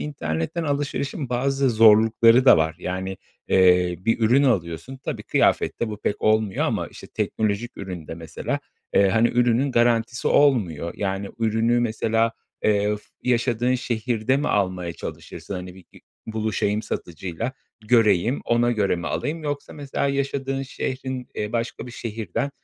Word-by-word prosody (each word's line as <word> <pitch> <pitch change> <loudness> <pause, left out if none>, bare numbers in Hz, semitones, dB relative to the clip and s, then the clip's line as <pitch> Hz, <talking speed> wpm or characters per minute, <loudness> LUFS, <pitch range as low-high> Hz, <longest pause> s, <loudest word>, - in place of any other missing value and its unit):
internetten 85 - -3
alışverişin 140 -1 -2
bazı 135 +2 +1
zorlukları 115 +2 +6
da 135 - +8
var. 80 0 0
Yani, 95 +1 -4 0.3
eee, 90 -1 +4
bir 115 +5 0
ürün 120 +5 +4
alıyorsun, 100 - -1
tabii 130 - -5
kıyafette 120 - +1
bu 105 - -5
pek 105 - -2
olmuyor 110 -2 +2
ama, - - -1
işte, - - -12
teknolojik 110 +2 -2
üründe 90 -5 -7
mesela, 80 -1 -4 0.3
eee, 100 - +5
hani, 115 +4 +3
ürünün 125 +3 +2
garantisi 120 0 +2
olmuyor. 95 - +2
Yani, 100 0 -2
ürünü 115 +2 +2
mesela, 115 0 +1 0.3
eee, 105 0 +2
f 105 - -15 0.2
yaşadığın 120 0 +1
şehirde 120 +1 0
mi 145 - -1
almaya 90 -4 0
çalışırsın, 100 - -8
hani, 90 0 -7
bi 95 - -15
bi - - -16 0.3
buluşayım 110 -1 -1
satıcıyla, 90 - -5 0.3
göreyim, 110 +1 +3
ona 120 +1 +2
göre 100 -5 +1
mi 85 - -5
alayım, 155 +2 -3
yoksa 145 -1 -4
mesela 140 -1 -3
yaşadığın 135 -1 -2
şehrin, 130 -1 -4
eee, 105 0 -3
başka 115 +1 -3
bir - - -8
şehirden, 115 +3 -4
115 Hz, 145 wpm, -23 LUFS, 95-125 Hz, 0.3 s, da